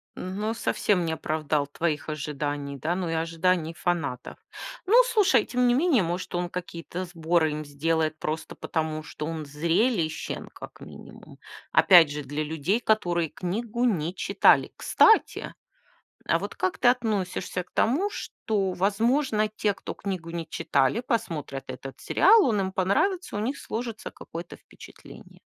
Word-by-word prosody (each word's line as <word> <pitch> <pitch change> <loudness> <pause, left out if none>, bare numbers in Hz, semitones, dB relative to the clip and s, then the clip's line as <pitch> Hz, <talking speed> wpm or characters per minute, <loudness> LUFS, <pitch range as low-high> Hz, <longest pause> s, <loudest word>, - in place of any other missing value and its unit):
Но 205 +4 -3
совсем 195 -5 0
не 160 - -1
оправдал 155 -2 -1
твоих 155 +1 -2
ожиданий, 145 -1 -4
да, 160 +5 -1
ну 180 -2 -2
и - - -1
ожиданий 165 +1 0
фанатов. 160 -9 -3 0.5
Ну 390 - 0
слушай, 395 - +3
тем 250 0 +1
не 240 - +4
менее, 275 - +3
может, 175 +2 -3
он 175 0 -1
какие-то 180 0 -6
сборы 165 -2 +1
им 150 0 -4
сделает 155 +2 -1
просто 155 +1 -4
потому, 155 -1 -3
что 150 - -7
он 160 -1 -4
зрелищен 165 - -1
как - - -12
минимум. - - -13 0.3
Опять 170 -6 +7
же, 150 0 -4
для 145 +2 -3
людей, 160 +7 -1
которые 175 -8 +1
книгу 225 +9 -2
не 175 -6 0
читали. - - +3
Кстати! 445 - +3 0.7
А - - +3
вот - - -6
как 370 - -1
ты - - +3
относишься 210 -7 0
к - - -32
тому, 310 - +1
что, 205 - -2
возможно, 215 +4 +1
те, 210 -1 -1
кто - - -7
книгу 185 -4 -5
не 170 -2 -5
читали, 140 - +1
посмотрят 160 - -3
этот 135 -1 -8
сериал, 435 0 +5
он 215 -4 +1
им 190 -1 -1
понравится, 275 - 0
у - - -1
них 250 +7 -2
сложится 230 -1 -5
какое-то 170 +1 -9
впечатление? - - -15
175 Hz, 150 wpm, -26 LUFS, 155-220 Hz, 0.7 s, Опять